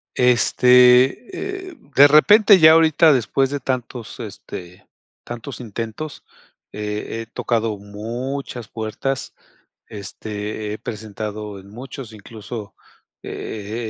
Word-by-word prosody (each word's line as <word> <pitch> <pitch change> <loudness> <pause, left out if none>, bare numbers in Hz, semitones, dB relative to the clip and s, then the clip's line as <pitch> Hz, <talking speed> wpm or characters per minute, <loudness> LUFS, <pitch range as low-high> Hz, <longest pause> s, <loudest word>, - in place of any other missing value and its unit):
Este, 125 - +4
eh, 360 - -13 0.2
de 140 +1 +9
repente 200 +7 +6
ya 155 0 +9
ahorita, 160 -1 +5
después 135 +2 +1
de 145 0 -3
tantos, 125 -2 -4
este, 95 -5 -9 0.4
tantos 120 +3 -7
intentos, 115 +6 -6 0.5
eh, 105 +2 -4
he - - -7
tocado 115 -3 -1
muchas 115 +4 -6
puertas. 115 +5 -4 0.5
Este, 105 +1 -6
he - - -5
presentado 105 -1 -6
en 95 +1 -15
muchos, 125 +1 -9
incluso, 110 0 -9 0.5
eh, 110 +2 -5
120 Hz, 105 wpm, -21 LUFS, 105-135 Hz, 0.5 s, de